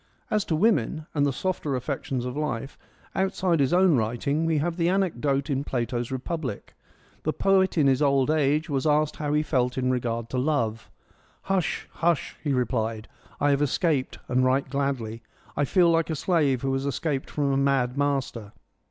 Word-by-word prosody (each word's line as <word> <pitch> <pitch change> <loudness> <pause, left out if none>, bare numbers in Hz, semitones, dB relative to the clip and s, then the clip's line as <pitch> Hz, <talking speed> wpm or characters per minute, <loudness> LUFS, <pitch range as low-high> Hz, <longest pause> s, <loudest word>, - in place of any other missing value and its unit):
As 215 -1 +2
to 160 - 0
women, 155 - +1
and 145 -2 +2
the - - +1
softer 150 -1 -2
affections 130 0 -3
of 125 +1 -4
life, 135 -3 -3 0.4
outside 190 -3 +1
his 135 -2 +2
own 180 -2 +5
writing 125 +7 0
we 160 -1 +2
have 165 +3 -1
the 170 0 +2
anecdote 150 -8 0
in 140 -2 -1
Plato's 120 -2 -2
Republic. 130 -2 -4 0.5
The 155 - 0
poet 190 -2 +2
in 150 - +4
his 135 0 +3
old 140 -1 +3
age 150 0 +2
was 140 -1 -1
asked 150 0 +2
how 150 -1 -2
he 150 0 +2
felt 125 -4 0
in 130 0 +1
regard 115 -2 -2
to 130 - 0
love: 120 -6 -1 0.3
' - - -35
Hush, 190 -4 -1
hush,' 170 -2 0
he 150 - 0
replied; 110 -3 -1 0.2
' - - -26
I 145 - +3
have 140 0 +2
escaped 145 -1 0
and 130 +1 +2
right 130 +2 +2
gladly. 130 -5 -2 0.3
I 145 - +1
feel 170 +4 +4
like 165 0 +1
a 160 - -1
slave 145 -6 +1
who 135 0 0
has 135 +1 -1
escaped 140 -1 -2
from 145 -2 0
a 135 - +1
mad 135 -2 +1
master.' 135 -7 -2
140 Hz, 185 wpm, -26 LUFS, 130-155 Hz, 0.5 s, own